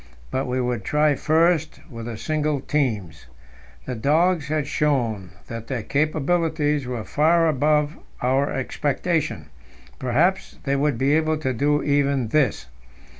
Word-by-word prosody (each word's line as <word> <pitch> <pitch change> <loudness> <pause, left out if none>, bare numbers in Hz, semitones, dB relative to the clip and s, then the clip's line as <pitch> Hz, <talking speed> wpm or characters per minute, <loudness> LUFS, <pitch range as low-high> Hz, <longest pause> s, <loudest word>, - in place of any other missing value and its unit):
But 130 +1 -1
we 125 +1 -1
would 125 -3 -1
try 150 0 +2
first 160 +3 +1
with 115 -6 -8
the 115 -2 -5
single 150 +1 -1
teams. 110 - -2 0.6
The 130 - -4
dogs 155 +6 +2
had 155 -1 -1
shown 120 -11 0 0.2
that 115 -1 -7
their 125 -5 -3
capabilities 155 0 0
were 120 -3 -4
far 165 +6 +3
above 150 +1 +1 0.2
our 135 +3 +1
expectation; 145 - -2 0.5
perhaps 155 +10 +1
they 140 -1 0
would 140 -2 +1
be 135 +4 +2
able 155 0 +1
to 130 -4 -2
do 145 +4 +1
even 140 -4 +1
this. 135 - +1
145 Hz, 135 wpm, -23 LUFS, 125-155 Hz, 0.6 s, far